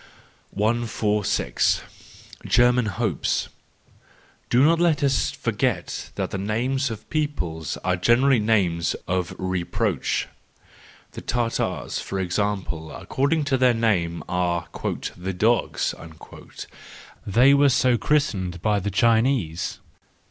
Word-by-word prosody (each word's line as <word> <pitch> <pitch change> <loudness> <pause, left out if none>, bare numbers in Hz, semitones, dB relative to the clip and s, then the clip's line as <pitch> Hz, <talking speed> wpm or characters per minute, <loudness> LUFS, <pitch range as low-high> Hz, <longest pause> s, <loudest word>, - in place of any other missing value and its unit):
146. 105 -1 0 0.6
German 120 -1 +4
Hopes 95 - -1 0.5
.— - - -32
Do 125 +3 +4
not 165 +2 +4
let 165 -4 +2
us 135 -1 +2
forget - - -2
that - - -3
the 95 - -3
names 125 +7 -1
of 110 -2 -8
peoples 90 - -2
are 90 0 +1
generally 120 +7 +3
names 95 -6 +1
of 90 -2 -1
reproach. 95 -2 -1 0.8
The - - -8
Tartars, 120 -1 -2
for 95 - -4
example, 90 -3 -2
according 145 +4 -1
to 135 -3 0
their 125 -2 +4
name, 90 -7 0
are 90 -1 -1 0.2
" - - -6
the 95 +2 -4
dogs 110 +6 +1 0.6
"; - - -14
they 125 +7 +5
were 140 0 +5
so 130 -1 +3
christened 95 -13 0
by 105 +3 +1
the 100 +1 -3
Chinese. 110 - +1
110 Hz, 115 wpm, -24 LUFS, 90-130 Hz, 0.8 s, they